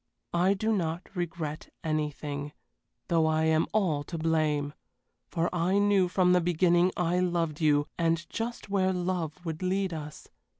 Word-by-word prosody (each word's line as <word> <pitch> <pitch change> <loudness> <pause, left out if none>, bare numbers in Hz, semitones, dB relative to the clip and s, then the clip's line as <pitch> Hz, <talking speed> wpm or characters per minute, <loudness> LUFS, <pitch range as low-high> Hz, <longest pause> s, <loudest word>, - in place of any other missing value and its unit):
I 180 +3 +3
do 220 +3 0
not 170 -3 -2
regret 165 -4 -4
anything, 150 -2 -3 0.5
though 165 -3 +3
I 160 0 +2
am 160 0 +3
all 185 -9 +1
to 170 - -5
blame, 155 -3 0 0.5
for 170 0 0
I 180 +3 +1
knew 200 -2 +4
from 180 0 +3
the 180 - +4
beginning 175 +1 +3
I 175 0 +1
loved 170 -4 0
you, 145 -2 +3
and 165 0 +1
just 235 +1 -4
where 190 -1 +1
love 180 -2 -3
would 160 0 -4
lead 185 0 0
us. 150 -2 -7
170 Hz, 155 wpm, -29 LUFS, 155-185 Hz, 0.5 s, knew